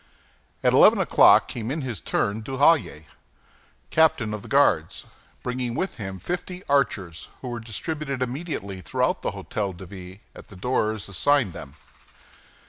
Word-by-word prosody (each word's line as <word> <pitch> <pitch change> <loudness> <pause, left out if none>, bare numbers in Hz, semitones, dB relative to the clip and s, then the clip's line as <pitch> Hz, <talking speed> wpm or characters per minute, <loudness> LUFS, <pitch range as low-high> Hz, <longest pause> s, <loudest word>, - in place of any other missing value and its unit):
At - - +4
eleven - - +7
o'clock - - +6
came 115 -1 -5
in 150 +4 -2
his 120 -8 -4
turn 100 +2 -1
Duhallier, 130 - +2 0.9
captain 135 -9 +3
of 105 - -5
the - - -11
Guards, 95 - +2 0.4
bringing 125 -1 -3
with 190 - -3
him 95 -4 -6
fifty 180 - -5
archers, 100 - 0
who 125 - -5
were 120 -1 -4
distributed 140 +5 -4
immediately 125 - -4
through - - 0
the - - -2
Hôtel 100 -4 -4
de 95 - -9
Ville, 95 0 -10 0.2
at - - -12
the 100 - -13
doors 110 0 -1
assigned 120 +1 +2
them. 70 +1 -10
115 Hz, 145 wpm, -24 LUFS, 95-140 Hz, 0.9 s, eleven